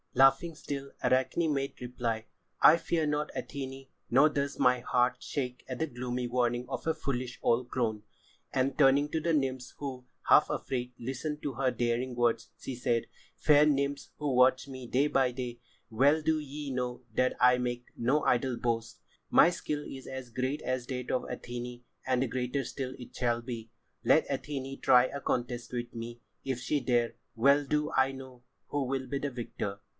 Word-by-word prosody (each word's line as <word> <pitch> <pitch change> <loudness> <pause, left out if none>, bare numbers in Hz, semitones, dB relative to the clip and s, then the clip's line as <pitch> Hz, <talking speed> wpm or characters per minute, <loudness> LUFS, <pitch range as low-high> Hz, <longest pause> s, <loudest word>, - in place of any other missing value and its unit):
Laughing 135 +6 +5
still, 140 -2 -5
Arachne 130 +5 +2
made 135 0 -3
reply: 120 -2 -3 0.3
"I 160 - +8
fear 165 -1 0
not, 150 0 -1
Athené, 135 -1 -6 0.2
nor 135 +5 +6
does 140 -2 -2
my 125 0 +4
heart 125 +1 +1
shake 125 -3 -3
at 130 - -4
the 160 - 0
gloomy 125 -1 -3
warning 120 0 0
of 135 - -5
a 160 - +3
foolish 130 -5 -3
old 120 +1 +2
crone." 110 -4 -1 0.5
And 130 +1 0
turning 140 0 +5
to 160 +1 -1
the 170 - +1
nymphs 130 -4 -1
who, 130 -3 -6 0.2
half - - +6
afraid, 125 -1 -2
listened 135 +5 -4
to 140 - -2
her 130 +1 +1
daring 120 +1 -1
words, 115 -1 +1
she 130 - -5
said: 120 -1 0 0.3
"Fair 150 0 +6
nymphs 140 -1 0
who 145 -3 -1
watch 130 +1 +4
me 130 -2 -8
day 130 +4 +2
by 135 -3 +2
day, 120 -1 -5 0.3
well 140 +7 +4
do 160 0 +2
ye 145 -1 -6
know 125 -1 -3
that 130 +3 +1
I 125 0 +6
make 120 -1 -2
no 135 +6 +1
idle 125 +1 +2
[Pg - - -9
85] - - -14
boast. 115 -1 -1 0.3
My - - +7
skill 150 -4 -3
is 135 -1 -8
as 130 -2 -6
great 130 +5 -2
as 130 -1 -2
that 125 -2 -4
of 130 - +1
Athené, 120 0 -6 0.2
and 130 -1 +1
greater 130 +2 -1
still 130 0 -5
it 125 - -11
shall 120 -1 0
be. 115 -2 -6 0.3
Let 130 +6 +4
Athené 135 0 -4
try 125 0 +6
a 140 +2 -5
contest 120 -1 -2
with 120 -1 -4
me 115 +1 -6 0.2
if 130 -2 -2
she 140 +3 0
dare! 120 -2 +1 0.2
Well 140 +5 +5
do 150 +2 0
I 135 0 +4
know 130 -2 -11 0.3
who 145 -1 0
will 130 0 -2
be 140 - -2
the 145 0 -2
victor." 110 -5 -5
130 Hz, 185 wpm, -30 LUFS, 125-140 Hz, 0.5 s, I